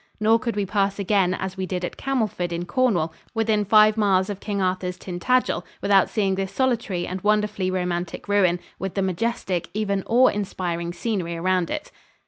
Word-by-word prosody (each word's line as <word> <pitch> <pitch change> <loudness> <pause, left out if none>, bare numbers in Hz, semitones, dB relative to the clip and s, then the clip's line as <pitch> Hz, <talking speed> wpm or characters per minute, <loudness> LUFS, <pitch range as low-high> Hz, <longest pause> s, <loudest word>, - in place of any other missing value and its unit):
Nor 220 +2 +4
could 235 -3 -3
we 205 -1 0
pass 200 0 0
again 195 -2 +2
as 190 0 -5
we 190 -1 -2
did 180 -1 -2
at - - -6
Camelford 220 -10 -1
in 170 +1 -3
Cornwall 185 -10 +1 0.2
within 220 -2 +2
five 215 +1 +5
miles 195 -2 +2
of 200 - -6
King 205 -1 -3
Arthur's 185 -1 -1
Tintagel 250 +8 0 0.2
without 200 -2 +4
seeing 200 -4 +1
this 190 0 -2
solitary 225 -7 0
and 185 +1 -5
wonderfully 210 -2 +1
romantic 180 -1 -3
ruin, 190 -4 +3 0.2
with 195 -1 -4
the 195 - +1
majestic 190 -1 -2
even 200 -2 0
awe 250 +3 +5
inspiring 175 -4 -3
scenery 175 -2 -3
around 180 0 +1
it. 305 - -4
195 Hz, 175 wpm, -24 LUFS, 180-215 Hz, 0.2 s, five